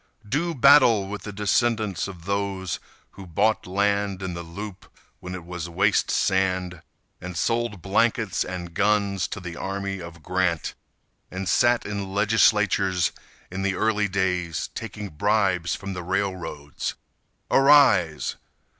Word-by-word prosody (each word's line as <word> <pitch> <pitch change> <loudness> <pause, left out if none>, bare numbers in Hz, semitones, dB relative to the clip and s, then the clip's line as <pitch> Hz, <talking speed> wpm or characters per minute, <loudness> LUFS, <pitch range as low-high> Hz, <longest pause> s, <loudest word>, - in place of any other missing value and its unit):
Do 160 +8 -1
battle 125 -6 +6
with 105 +1 -6
the 105 - -7
descendants 105 -1 0
of 90 -4 -10
those 100 -2 -2 0.3
Who 95 -1 -11
bought 105 +6 +1
land 100 0 0
in 95 -1 -3
the 85 - -5
loop 95 +4 -8 0.3
when 90 0 -6
it 90 -2 -8
was 85 -1 -6
waste 85 - +2
sand, 95 -2 0 0.4
And 90 -1 -6
sold 115 +1 -1
blankets 110 +1 +1
and 90 -2 -6
guns 100 -2 +1
to 100 - -6
the 85 -2 -7
army 95 +1 -4
of 85 -2 -10
Grant, 90 -2 0 0.6
And 95 +1 -5
sat 120 +4 +3
in 100 -2 -4
legislatures 100 -3 +3 0.4
in 95 +1 -4
the 95 -1 0
early 105 -1 +1
days, 90 -5 -1
Taking 105 -1 -6
bribes 95 0 +1
from 100 -1 -6
the 90 - -5
railroads! 90 -5 -3 0.6
Arise! 130 - +4
95 Hz, 135 wpm, -24 LUFS, 90-105 Hz, 0.6 s, battle